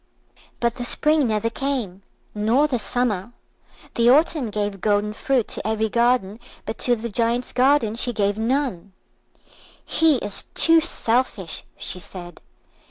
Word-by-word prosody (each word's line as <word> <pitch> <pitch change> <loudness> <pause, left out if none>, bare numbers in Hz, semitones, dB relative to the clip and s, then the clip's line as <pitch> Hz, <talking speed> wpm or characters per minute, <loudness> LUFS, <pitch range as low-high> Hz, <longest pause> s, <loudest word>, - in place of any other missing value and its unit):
But 235 -1 0
the 245 - -4
Spring 300 +3 +2
never 220 +1 -1
came, 235 -9 -3 0.3
nor 225 +7 +2
the 265 -5 -1
Summer. 235 -3 -2 0.6
The 235 0 +3
Autumn 295 -2 +3
gave 205 -2 -4
golden 210 0 0
fruit 255 0 -1
to - - -4
every 220 0 -1
garden, 235 -3 +1 0.3
but - - -6
to 245 - +3
the 235 +1 -6
Giant's 235 +2 -1
garden 255 -4 +2
she 245 +2 +4
gave 205 -3 0
none. 225 -5 -2 0.9
"He 320 -2 +3
is 205 -5 -2
too 330 0 +5
selfish," 235 - 0
she 180 - -2
said. 175 -1 -10
230 Hz, 140 wpm, -22 LUFS, 210-255 Hz, 0.9 s, too